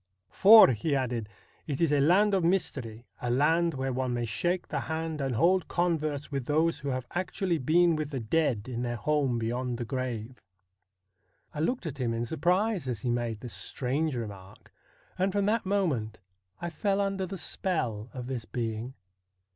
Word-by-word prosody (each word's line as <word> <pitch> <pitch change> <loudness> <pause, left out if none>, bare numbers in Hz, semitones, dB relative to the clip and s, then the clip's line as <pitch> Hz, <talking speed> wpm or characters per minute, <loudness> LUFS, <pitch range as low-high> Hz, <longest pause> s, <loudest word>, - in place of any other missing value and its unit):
' - - -54
For,' 215 -2 +9
he 130 +5 0
added, 120 -5 -2 0.2
' - - -34
it 140 -3 -3
is 165 -3 +2
a 145 - +3
land 190 +8 +4
of 190 -3 +2
mystery, 130 - -1 0.2
a 125 - -2
land 160 +6 +2
where 130 0 -2
one 130 -1 -1
may 120 -1 -1
shake 175 +11 -1
the - - -2
hand 160 -1 -3
and 135 -3 -1
hold 180 +6 +3
converse 155 -5 -1
with 135 -3 -3
those 160 +3 +2
who 140 - -4
have 130 -1 -2
actually 180 -1 -1
been 170 +5 +3
with 155 -2 -3
the 135 -3 -3
dead 120 -2 0
in 120 -2 -4
their 120 -1 -2
home 135 +1 0
beyond 120 +2 -2
the 120 - -4
grave.' 125 -1 -4 1.1
I 150 - -6
looked 245 +8 -1
at 145 -3 -5
him 115 -2 0
in 115 +1 -2
surprise 180 - 0
as 120 -5 -3
he 120 - -1
made 120 -3 -2
this 125 - -4
strange 140 +3 -1
remark, 100 -5 -8 0.5
and 190 +1 +2
from 200 0 0
that 215 -1 +1
moment 145 - 0 0.4
I 175 - -4
fell 200 +4 0
under 195 -1 -1
the 195 +2 -6
spell 125 - -2
of 125 -2 -6
this 125 -3 -4
being. 115 +2 -4
140 Hz, 185 wpm, -29 LUFS, 120-170 Hz, 1.1 s, For